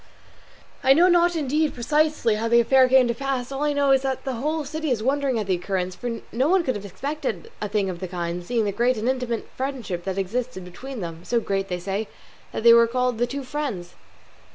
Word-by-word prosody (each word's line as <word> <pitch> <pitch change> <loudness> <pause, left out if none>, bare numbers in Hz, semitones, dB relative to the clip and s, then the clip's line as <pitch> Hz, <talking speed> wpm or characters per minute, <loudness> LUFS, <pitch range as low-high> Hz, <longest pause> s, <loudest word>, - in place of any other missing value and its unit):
I 265 - +7
know 340 +5 +5
not 350 -1 +4
indeed, 305 0 0
precisely, 300 -1 +1
how 220 +2 -1
the 235 +1 +5
affair 260 +2 +5
came 260 -1 +5
to 235 - 0
pass; 265 0 -3
all 270 +1 -4
I 295 0 +2
know 285 -1 +2
is 270 -1 +5
that 265 -1 -2
the 265 - -2
whole 300 +5 -2
city 315 +2 -3
is 230 -4 0
wondering 270 -1 +1
at 215 - -1
the 190 - +1
occurrence, 185 0 -2
for 230 +4 -5
no 260 +6 +1
one 375 -1 +4
could 260 - 0
have 205 -1 -6
expected 300 - -4
a 210 - -2
thing 205 -1 0
of 180 -2 -4
the 185 - -4
kind, 175 0 -4
seeing 230 +3 0
the 200 - 0
great 240 +4 +1
and 220 +2 -2
intimate 250 -3 -1
friendship 250 -10 -4
that 190 0 -3
existed 210 +1 -3
between 245 +7 -8
them, 165 -1 -6
so 235 - +1
great, 195 -3 -2
they 180 - -2
say, 195 +4 -3 0.4
that - - -4
they 235 0 +9
were 235 0 +6
called 250 -1 0
'The 240 - +2
Two 275 +3 -5
Friends. 250 -11 -4
245 Hz, 230 wpm, -24 LUFS, 200-275 Hz, 0.4 s, they